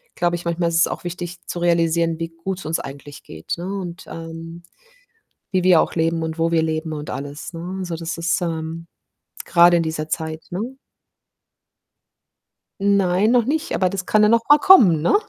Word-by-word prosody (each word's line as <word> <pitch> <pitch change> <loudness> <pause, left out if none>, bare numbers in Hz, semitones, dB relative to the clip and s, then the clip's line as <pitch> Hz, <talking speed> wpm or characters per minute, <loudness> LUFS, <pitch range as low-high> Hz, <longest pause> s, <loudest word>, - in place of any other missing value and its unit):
glaube 175 0 +1
ich, 175 - -7
manchmal 170 0 0
ist 165 - -2
es 170 - +5
auch - - -6
wichtig 175 0 -6
zu 175 - -5
realisieren, 165 -1 +1
wie 165 0 -3
gut's 190 0 -4
uns 160 +1 -1
eigentlich 140 +1 -10
geht, 80 0 -7
ne, 170 - -6
und, 185 -3 -6
ähm, 165 +1 -8 0.9
wie 185 -1 +2
wir 180 -3 +6
auch - - -1
leben 165 0 0
und 160 0 -5
wo 165 0 +1
wir 165 - +3
leben 160 0 -2
und 150 -1 -6
alles, 145 +5 -6
ne? 175 +3 -6
Also, 180 -3 -4
das 165 +1 -5
ist, 165 +1 0
ähm 165 0 -4 0.6
grade 175 0 +6
in - - +1
dieser 160 -1 -3
Zeit, 160 0 -4
ne? 180 - -4 2.2
Nein, 200 0 +3
noch 240 -1 +3
nicht, 305 +5 -1
aber 185 - +2
das 195 -1 -4
kann 215 0 +4
ja 210 - +5
noch 230 +1 +4
mal 295 - +8
kommen, 210 - +6
ne? - - +3
170 Hz, 190 wpm, -21 LUFS, 160-180 Hz, 2.2 s, mal